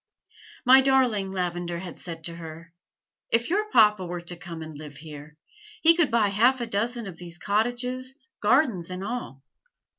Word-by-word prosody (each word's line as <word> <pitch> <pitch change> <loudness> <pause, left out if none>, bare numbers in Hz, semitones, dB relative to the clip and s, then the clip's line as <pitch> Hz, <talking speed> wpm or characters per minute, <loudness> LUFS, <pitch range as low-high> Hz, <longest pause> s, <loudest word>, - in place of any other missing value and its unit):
"My 260 +2 +8
darling," 250 -8 +2
Lavender 175 -2 -3
had 175 -1 -8
said 165 -2 -5
to 170 0 -5
her, 165 0 -10 0.6
"if 235 +5 +1
your 425 +3 0
papa 210 - +5
were 175 0 -5
to 175 +1 -6
come 165 -1 -8
and 155 -1 -9
live 145 -1 -10
here, 150 0 -11 0.5
he 330 +1 +8
could 330 -5 +3
buy 225 -4 +2
half 240 +6 +3
a 240 - -2
dozen 230 +2 -2
of 185 -4 -8
these 170 -1 -7
cottages, 245 +6 -1 0.2
gardens 210 - +2
and 185 +1 -5
all. 205 - -5
195 Hz, 170 wpm, -26 LUFS, 170-245 Hz, 0.6 s, My